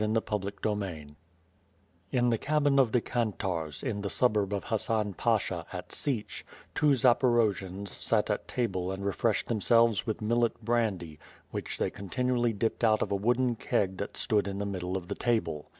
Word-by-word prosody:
CHAPTEE 105 -3 -1
XL 105 -1 0 1.3
In 125 -1 +2
the 115 - +2
cabin 145 -2 +2
of 125 -4 +4
the 125 - +3
Kantarz^ 95 - -2
in 105 -6 -2
the 100 - -3
suburb 105 -5 +2
of 100 -1 -2
Hassan 110 -2 -1
Pasha 100 -6 0
at 90 -1 -7
Sich, 130 -8 -3 0.3
two 145 -2 +4
Zaporojians 110 -6 +2
sat - - +1
at - - -3
table 95 -7 -1
and 95 +1 -5
refreshed 100 -1 +1
themselves 115 0 +3
with 110 - -1
millet 115 +2 +1
brandy 100 -10 -1 0.3
which - - -4
they - - 0
continuously 120 +4 0
dipped 110 +3 -2
out 110 -1 +4
of - - -5
a - - +2
wooden 120 +4 +1
keg 95 -3 0
that 100 - -5
stood 105 -2 +1
in 100 0 -4
the 100 - -2
middle 95 -2 -3
of 90 -2 -8
the - - -2
table. 85 -11 -1
110 Hz, 165 wpm, -29 LUFS, 95-120 Hz, 1.3 s, of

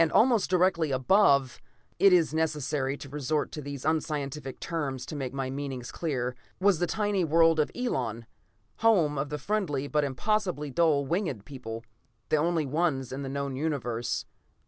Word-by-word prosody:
Almost 230 +1 +4
directly 180 -3 +2
above 140 -1 +3 0.4
it 195 - +7
is 170 -4 +4
necessary 150 -3 -1
to 140 - -9
resort 145 +1 -1
to 150 - -6
these 140 -1 -7
unscientific 150 -3 -2
terms 140 -6 -3
to - - -7
make 135 -3 -3
my 135 -1 -3
meaning 135 -2 -4
clear 125 -1 -3 0.2
was 190 -3 +3
the 175 - +1
tiny 205 -2 0
world 165 0 +4
Elon, 120 - -2 0.5
home 175 -11 +3
of 140 +1 -2
the 150 - -3
friendly 150 -5 -1
but 150 0 +1
impossibly 150 - -1
dull 150 -2 +3
winged 160 - -2
people, 115 -5 -7 0.5
the 155 - +3
only 165 0 +1
ones 140 -3 0
in 135 +2 -4
the 135 - -4
known 140 -1 -3
Universe. 130 -6 -2
150 Hz, 155 wpm, -28 LUFS, 135-170 Hz, 0.5 s, it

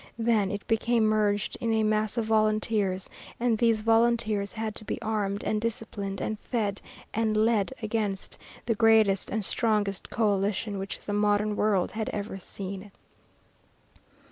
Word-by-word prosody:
Then 225 -4 +2
it 205 +1 -5
became 230 +1 +2
merged 210 -1 +1
in 230 - 0
a 220 0 +2
mass 215 +1 +1
of 230 - +1
volunteers, 215 -3 +1 0.3
and 240 -1 +2
these 225 -1 +2
volunteers 225 -3 +2
had 220 -1 -3
to - - -7
be 215 - -4
armed 210 -3 -2
and 215 -1 0
disciplined 215 -3 -3
and 215 -1 -3
fed 210 -5 -2 0.3
and 220 -1 +1
led 215 -1 +2
against 210 -3 -2 0.3
the 230 - +2
greatest 220 -3 +4
and 215 -1 -1
strongest 210 -4 0
coalition 205 -1 0
which 195 +1 -5
the 205 - -4
modern 210 0 +2
world 205 -4 +1
had 220 +1 -3
ever 205 -1 -4
seen. 195 +1 -7
215 Hz, 145 wpm, -27 LUFS, 205-225 Hz, 0.3 s, greatest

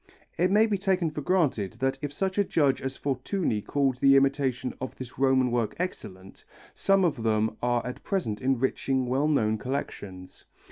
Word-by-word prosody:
It 180 +2 +2
may 210 +3 +5
be 205 -3 -1
taken 185 -4 +1
for 150 - -5
granted 145 - +1
that 135 0 -2
if 145 - -3
such 190 +6 -2
a - - +5
judge 145 -8 +1
as 135 0 -4
Fortuny 135 - -1
called 135 +3 0
the 135 +1 +6
imitation 135 -2 +1
of 130 - -5
this 130 -1 -9
Roman 130 -2 +3
work 115 -3 -1
excellent, 95 - -6 0.3
some 195 -1 +2
of 145 -8 -1
them 110 -1 +1
are 120 -1 0
at 125 - -6
present 140 - -2
enriching 130 0 0
well 135 +4 +1
known 110 -8 +1
collections. 100 -8 -6
135 Hz, 175 wpm, -27 LUFS, 120-155 Hz, 0.3 s, the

